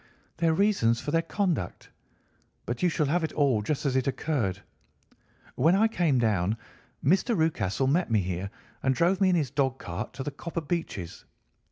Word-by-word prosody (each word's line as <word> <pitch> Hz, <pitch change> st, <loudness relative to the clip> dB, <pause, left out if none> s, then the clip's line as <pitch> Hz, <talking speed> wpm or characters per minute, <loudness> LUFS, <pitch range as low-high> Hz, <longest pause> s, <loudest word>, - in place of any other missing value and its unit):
"Their 165 Hz, -1 st, +2 dB
reasons 160 Hz, -, +2 dB
for 145 Hz, -, -4 dB
their 165 Hz, +1 st, +3 dB
conduct. 165 Hz, -, -2 dB, 0.7 s
But 120 Hz, 0 st, -4 dB
you 180 Hz, -, +4 dB
shall 155 Hz, -2 st, 0 dB
have 165 Hz, +5 st, +1 dB
it 160 Hz, -, -2 dB
all 135 Hz, -7 st, +2 dB
just 140 Hz, +8 st, -2 dB
as 135 Hz, -2 st, +1 dB
it 130 Hz, +1 st, +1 dB
occurred. 130 Hz, -, -1 dB, 0.9 s
When 160 Hz, +8 st, +3 dB
I 215 Hz, +3 st, +4 dB
came 170 Hz, -11 st, +1 dB
down, 105 Hz, -3 st, +1 dB, 0.5 s
Mr. 195 Hz, -, +3 dB
Rucastle 135 Hz, -, +1 dB
met 160 Hz, +5 st, +2 dB
me 110 Hz, -3 st, +3 dB
here 90 Hz, +1 st, -3 dB, 0.3 s
and 130 Hz, 0 st, +1 dB
drove 180 Hz, +7 st, +2 dB
me 190 Hz, -, +5 dB
in 180 Hz, -, +3 dB
his 145 Hz, -7 st, 0 dB
dog 135 Hz, -2 st, 0 dB
cart -, -, -6 dB
to 135 Hz, -, -5 dB
the 145 Hz, -, -4 dB
Copper 170 Hz, +4 st, -5 dB
Beeches. 145 Hz, -, -4 dB
145 Hz, 180 wpm, -27 LUFS, 115-170 Hz, 0.9 s, me